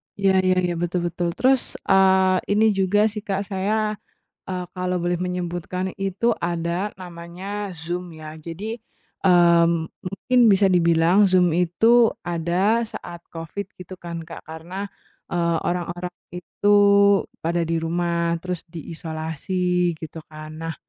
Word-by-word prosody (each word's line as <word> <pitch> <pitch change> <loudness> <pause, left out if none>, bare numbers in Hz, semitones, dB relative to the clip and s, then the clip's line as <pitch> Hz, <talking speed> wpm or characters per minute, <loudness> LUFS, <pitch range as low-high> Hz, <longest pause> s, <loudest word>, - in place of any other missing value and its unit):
Iya 195 -1 +3
iya 185 0 +4
iya, 175 -1 0
betul 175 0 -1
betul, 175 0 -2
terus, 260 0 +1
eee, 190 -1 +4
ini 215 +1 +4
juga 195 +1 +2
sih, 210 - -5
Kak, 200 -1 -2
saya, 210 +2 0 0.5
eee, 180 -1 -3
kalau 180 0 -1
boleh 175 +1 0
menyebutkan 180 +1 -3
itu, 195 +4 0
ada 170 +3 -1
namanya 185 +3 -6
Zoom, 175 +1 -5
ya. 155 -1 -9
Jadi, 175 +8 -6 0.5
eee, 170 -2 +6 0.4
mungkin 195 +7 0
bisa 195 0 +4
dibilang 170 +2 +4
Zoom 180 -3 +3
itu 225 +7 +4
ada 175 +7 +1
saat 175 -6 -8
Covid, 170 +5 -6
gitu 185 +1 -9
kan, 170 -2 -7
Kak, - - -9
karena, 175 +5 -7 0.4
eee, 170 -1 +1
orang-orang 175 0 -3 0.2
itu 205 +3 +2 0.6
pada 170 +1 0
di 165 0 -1
rumah, 170 0 0
terus 180 -2 -3
diisolasi, 170 +2 -2
gitu 160 0 -8
kan. 155 0 -9
Nah, 165 -1 -4
180 Hz, 130 wpm, -23 LUFS, 170-195 Hz, 0.6 s, eee